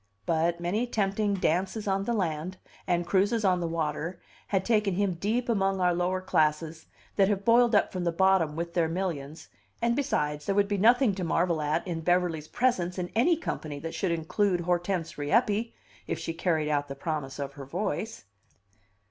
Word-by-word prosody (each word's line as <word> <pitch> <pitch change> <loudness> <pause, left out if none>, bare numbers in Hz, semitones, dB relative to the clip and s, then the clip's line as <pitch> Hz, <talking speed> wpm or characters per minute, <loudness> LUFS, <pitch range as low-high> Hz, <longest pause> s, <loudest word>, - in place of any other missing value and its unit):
But 165 +1 +1
many 200 +8 -1
tempting 205 -2 0
dances 190 +4 -1
on 195 0 0
the 235 - 0
land, 180 -3 -2 0.3
and 175 -1 +1
cruises 200 +5 +2
on 185 -2 +3
the 170 - -1
water, 165 +1 -3 0.3
had 190 -2 0
taken 210 -5 +2
him 200 -1 +1
deep 215 +8 -1
among 195 -4 +1
our 180 -1 +3
lower 180 +2 0
classes 160 -1 0 0.3
that 195 -2 +5
have 200 -1 -1
boiled 235 -1 +5
up 205 - +3
from 180 -1 -3
the 170 - +1
bottom 180 -3 +2
with 170 +1 -4
their 170 -2 +2
millions 165 -4 -4 0.3
and 235 0 +1
besides, 150 - -1
there 195 - +1
would 200 0 +3
be 205 -1 -1
nothing 240 +2 +5
to 185 -1 -4
marvel 170 -1 +1
at 150 +8 0
in 165 -2 -3
Beverly's 175 -2 +1
presence 190 -8 0
in 180 -1 -3
any 295 +10 +3
company 155 - -4
that 165 +3 -6
should 190 - -1
include 175 +3 0
Hortense 175 -1 -1
Rieppe, 215 +8 +1 0.3
if - - -2
she 165 0 -4
carried 160 -2 0
out 145 -1 0
the 140 - -6
promise 145 -2 -4
of 140 -1 -5
her 140 -1 -9
voice. 185 - -3
180 Hz, 185 wpm, -28 LUFS, 165-200 Hz, 0.3 s, that